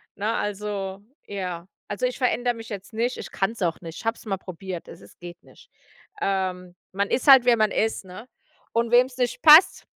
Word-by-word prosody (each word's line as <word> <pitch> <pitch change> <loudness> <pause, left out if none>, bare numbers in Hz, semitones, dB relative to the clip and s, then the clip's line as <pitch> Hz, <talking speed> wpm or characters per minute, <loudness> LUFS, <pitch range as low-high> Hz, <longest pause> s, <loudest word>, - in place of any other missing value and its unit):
Ne, 210 +2 -2
also 200 -1 -4 0.3
ja. 180 -3 -5 0.2
Also, 205 +5 -2
ich 250 - -2
verändere 245 -1 +1
mich 225 0 -10
jetzt 200 -3 -8
nicht, 240 +3 -1
ich - - -8
kann 195 +2 -1
es 230 - -13
auch 165 -2 -1
nicht. 165 -1 -9
Ich - - -12
habe 225 +1 0
es - - -16
mal 200 -3 -1
probiert, 185 -1 -8
also, 175 - -13
es - - -20
geht 175 0 -11
nicht. - - -20 0.5
Ähm, 185 -2 -2 0.2
man 200 +1 -1
ist 260 - -1
halt, 265 -3 +8
wer 245 -1 +5
man 215 -1 +2
ist, 220 -2 -1
ne? 185 +7 -11 0.5
Und 230 0 0
wem 245 +1 +6
es 260 - -15
nicht 245 -1 -2
passt, 315 +3 +7
205 Hz, 215 wpm, -24 LUFS, 185-240 Hz, 0.5 s, halt